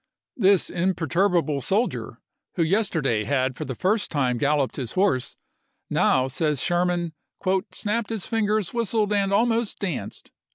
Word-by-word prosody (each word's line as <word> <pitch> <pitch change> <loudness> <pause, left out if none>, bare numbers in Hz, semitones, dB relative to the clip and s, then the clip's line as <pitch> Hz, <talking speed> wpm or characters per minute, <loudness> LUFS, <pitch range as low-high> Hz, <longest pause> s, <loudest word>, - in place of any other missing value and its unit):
This 195 -4 +3
imper 180 -2 -1
turbable 170 -4 +1
soldier, 210 - -1 0.4
who 170 - +2
yesterday 160 - +1
had 130 0 0
for - - -5
the 130 - -5
first 205 - +1
time 130 -5 0
galloped 145 -1 +1
his 125 -4 -4
horse, 185 -10 +1 0.6
now, 130 0 +3
says 150 +1 -1
Sherman, 175 0 0 0.3
" 190 0 +1
snapped 215 +1 -2
his 220 -4 -3
fingers, 215 -3 0
whistled, 220 -2 0
and 200 -1 +1
almost 230 +1 +1
danced." 180 -8 -5
180 Hz, 140 wpm, -24 LUFS, 145-205 Hz, 0.6 s, This